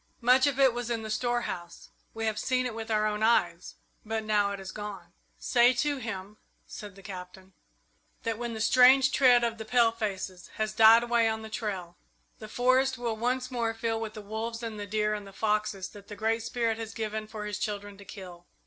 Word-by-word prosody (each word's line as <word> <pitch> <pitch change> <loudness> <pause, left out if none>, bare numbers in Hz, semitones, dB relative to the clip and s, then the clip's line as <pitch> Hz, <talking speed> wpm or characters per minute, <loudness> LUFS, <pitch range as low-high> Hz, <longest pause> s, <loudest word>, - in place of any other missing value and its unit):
Much 255 +3 +5
of 275 -1 -1
it 265 -3 +5
was 240 -1 -4
in 230 -2 -2
the 220 - -5
storehouse 215 -8 -3 0.3
we 225 0 -3
have 215 -1 -1
seen 255 -1 0
it 245 - -3
with 225 0 -6
our 215 -1 +2
own 210 0 -1
eyes, 180 -6 +1 0.3
but 220 0 -3
now 210 -2 +2
it 200 - -5
is 190 -1 -7
gone." 195 -5 -8 0.2
"Say 245 0 +4
to 290 +2 0
him," 210 -4 -6 0.3
said 205 -3 -9
the 195 - -15
Captain, 190 0 -10 0.7
"that 225 -1 -2
when 240 -1 -4
the 220 - -4
strange 260 +3 +6
tread 245 -3 +5
of 230 -1 -1
the - - -4
palefaces 220 -6 0
has 215 0 -2
died 225 +1 +7
away 235 -1 +2
on 220 0 -3
the 220 - -8
trail, 190 -7 -4 0.4
the 215 - -8
forest 255 +2 +2
will 235 -2 -2
once 250 +3 -1
more 230 -2 -1
fill 225 0 -2
with 220 -1 -5
the 215 - -8
wolves 225 +3 -5
and 220 -2 -5
the 205 - -5
deer 210 0 0
and 205 -1 -5
the - - -11
foxes 210 -2 -1
that 200 -1 -14
the 210 - -8
Great 225 +2 0
Spirit 230 -1 -1
has 225 -1 -6
given 215 -1 -3
for 215 -1 -7
his 210 -1 -4
children 205 -1 -4
to - - -11
kill. 180 -3 -11
220 Hz, 210 wpm, -28 LUFS, 205-235 Hz, 0.7 s, died